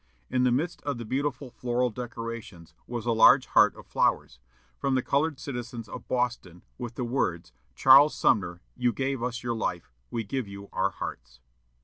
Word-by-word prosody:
In 125 0 +2
the 125 - +3
midst 155 +8 -1
of 145 -4 -3
the 120 - -6
beautiful 135 +1 -2
floral 125 0 -1
decorations 115 -8 -7
was 120 -2 -4
a 120 - +2
large 115 - +6
heart - - +4
of - - -13
flowers, 65 - 0 0.4
from 135 -1 +1
the 130 - +1
colored 145 0 0
citizens 120 -3 -6
of - - -9
Boston, 120 -9 -2 0.2
with 120 -2 -6
the 125 - -3
words, 90 -9 -2 0.2
"Charles 140 +3 +7
Sumner, 90 -4 +1
you 125 -1 +1
gave 135 -2 -2
us 120 -1 -3
your 120 -1 -1
life; 110 - -3 0.2
we 115 - -2
give 125 +2 -3
you 100 0 -10
our - - +1
hearts." 60 0 -8
120 Hz, 175 wpm, -27 LUFS, 110-130 Hz, 0.4 s, Charles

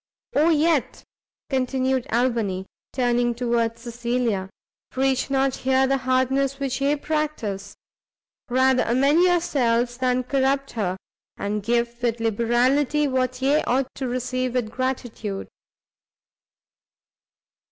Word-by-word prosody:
"Oh 305 +4 +4
yet," 315 -2 +1 0.5
continued 260 -1 0
Albany, 225 -6 0 0.3
turning 240 -1 +1
towards 235 -1 -1
Cecilia, 235 -4 -2 0.4
"preach 265 0 0
not 270 -1 +1
here 265 0 +2
the 270 +1 +2
hardness 260 +2 +1
which 275 -1 -2
ye 285 +2 +2
practice; 290 -11 -3 0.7
rather 260 +1 +3
amend 275 +7 +3
yourselves 250 -9 +2
than 255 0 +1
corrupt 275 +1 0
her; 190 -5 -2 0.4
and 205 +1 -2
give 235 +2 -1
with 235 -1 0
liberality 245 +6 +2
what 255 -1 -1
ye 285 +3 +3
ought 260 +1 0
to 265 - -4
receive 255 0 -2
with 230 -4 -1
gratitude!" 240 -6 -3
255 Hz, 110 wpm, -23 LUFS, 235-270 Hz, 0.7 s, Oh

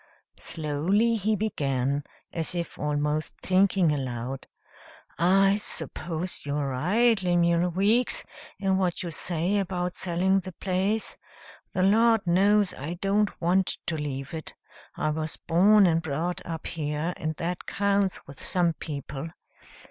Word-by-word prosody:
Slowly 170 +10 0
he 215 0 +1
began, 140 -9 -1 0.3
as 165 +1 -3
if 170 -2 -4
almost 150 +1 -1
thinking 185 -2 +3
aloud, 130 -2 -4 0.7
"I 195 +3 +4
suppose 175 -4 -3
you 145 0 -2
are 145 -2 -1
right, 200 - +2
Lemuel 175 -1 +2
Weeks, 205 +8 +2 0.3
in 190 -1 +1
what 180 -1 0
you 170 - -4
say 175 +5 0
about 180 -2 -2
selling 190 +2 +1
the 185 0 -8
place. 190 +5 -1 0.6
The 185 - +2
Lord 225 +2 +4
knows 195 +3 +3
I 155 +6 -5
don't 200 +3 0
want 180 +2 +1
to 165 - -1
leave 140 -2 -4
it. 160 -1 -7 0.4
I 155 - 0
was 155 0 -3
born 200 +5 +5
and 165 -2 +3
brought 170 +4 -2
up 165 -2 -5
here, 155 +1 -2
and 155 0 -3
that 175 +3 -4
counts 200 -1 0
with 140 - -10
some 175 -3 +2
people. 145 -1 -6
175 Hz, 135 wpm, -27 LUFS, 155-195 Hz, 0.7 s, born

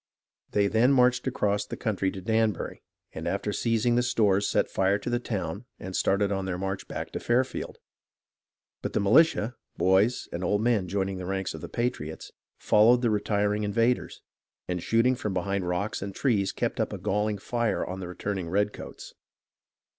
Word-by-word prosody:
They 100 -1 +2
then 110 +6 +3
marched 125 0 +3
across 105 -5 0
the 105 - -7
country 100 -3 0
to 95 - -7
Danbury, 110 -1 0 0.3
and - - -5
after - - -1
seizing 115 +1 +1
the 120 - +3
stores 105 -5 +2
set - - +2
fire 95 +1 +1
to 120 - -5
the 120 - +1
town 100 -2 -4
and 95 0 -6
started 100 +1 +2
on 95 -1 -1
their 90 -2 -2
march 95 +1 -4
back - - -5
to - - -4
Fairfield. 125 +2 -1 1.0
But - - -4
the - - +2
militia, 120 +2 +4 0.2
boys, 95 +6 +3
and 85 - -3
old 105 +3 +1
men, 115 -6 +2
join 95 +1 -1
ing 95 - -4
the 90 -1 -6
ranks 95 0 -2
of 80 - -8
the - - -7
patriots, 80 -10 -3 0.3
followed 120 +4 +4
the 115 - +3
retiring 105 0 +1
invaders, 115 +4 0 0.4
and 90 -1 -2
shooting 115 +7 +3
from 105 -6 -3
behind 95 0 -1
rocks 100 +5 -2
and 100 -1 -5
trees 100 -8 +1
kept - - -2
up - - 0
a - - -4
galling 105 +1 0
fire 120 +3 -1
on 95 +1 -5
the 90 - -5
returning 90 -1 -4
redcoats. 105 +3 -3
105 Hz, 180 wpm, -27 LUFS, 95-115 Hz, 1.0 s, militia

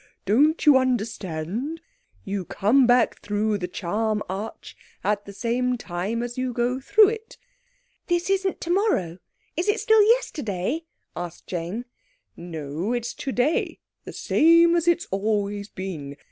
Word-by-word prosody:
Don't 290 - +3
you 295 -3 +8
understand? 225 - -2 0.4
You 195 -1 -3
come 235 +9 +3
back 245 0 +3
through 210 0 -1
the 180 - -3
charm 210 +4 -1
arch 200 +4 -6 0.3
at 205 0 0
the 200 - -9
same 240 +4 -1
time 205 +4 -3
as 240 +1 -5
you 255 -1 -1
go 245 +2 0
through 410 +9 +5
it. 450 0 -7 0.7
This 345 0 0
isn't 385 -1 0
tomorrow!" 340 - 0 0.4
"Is 350 +5 -1
it 415 - +2
still 440 -1 +5
yesterday?" 315 - 0 0.3
asked 175 -1 -7
Jane. 180 +7 -4 0.5
"No, 165 +4 -4
it's 240 -1 -2
today. 270 +3 -1 0.3
The - - -9
same 335 +2 +4
as 340 0 0
it's 345 0 +3
always 205 0 -1
been. 155 -7 -6
230 Hz, 135 wpm, -24 LUFS, 195-305 Hz, 0.7 s, you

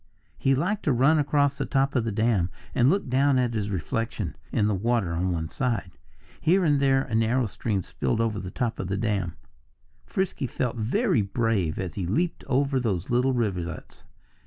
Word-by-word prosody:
He 135 0 +3
liked 185 +10 0
to 150 - +3
run 135 +6 +4
across 145 -1 +2
the - - 0
top 135 0 +1
of 120 -3 +2
the 115 - -1
dam 105 -4 +1 0.2
and 125 +2 +4
look 195 0 +1
down 135 +2 +3
at 125 -2 +1
his 105 -2 -2
reflection 110 +4 -3 0.2
in 105 - +2
the 105 - +2
water 100 -3 0
on 90 +2 0
one 80 -2 -2
side. 105 - -2 0.5
Here 180 +3 +3
and 145 -3 +3
there 135 -1 +3
a 120 - -8
narrow 115 +3 +2
stream 100 -2 -2
spilled 115 - -2
over 110 -3 0
the 90 - -6
top 120 +3 -2
of 95 - -3
the 95 +1 -1
dam. 100 -5 -1 0.7
Frisky 185 -8 -1
felt 125 0 -2
very 130 - +1
brave 100 -5 0
as 90 -5 -4
he 90 0 -3
leaped 165 - -1
over 135 0 +1
those 100 -7 -2
little 125 +2 +3
rivulets. 90 -9 -3
115 Hz, 190 wpm, -26 LUFS, 100-135 Hz, 0.7 s, run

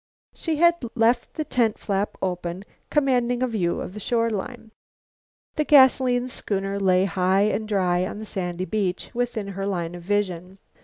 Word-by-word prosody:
She 325 -2 -2
had 340 0 +3
left 235 +1 +2
the 310 - -1
tent 230 -6 +1
flap 200 0 -2
open, 180 0 -3 0.2
commanding 250 -4 +1
a - - +2
view 190 -8 -1
of - - -6
the 210 - -7
shore 230 +2 0
line. 220 +2 -5 0.9
The 305 - +2
gasoline 260 -3 +5
schooner 200 -4 -3
lay 185 -1 +3
high 190 0 +2
and 215 +1 0
dry 185 -3 +1
on - - -7
the 220 - -7
sandy 180 -3 -3
beach, 190 -1 -2
within 235 -4 -2
her 195 0 -4
line 175 -4 -2
of 175 - -8
vision. 185 -1 -2
205 Hz, 165 wpm, -24 LUFS, 185-245 Hz, 0.9 s, gasoline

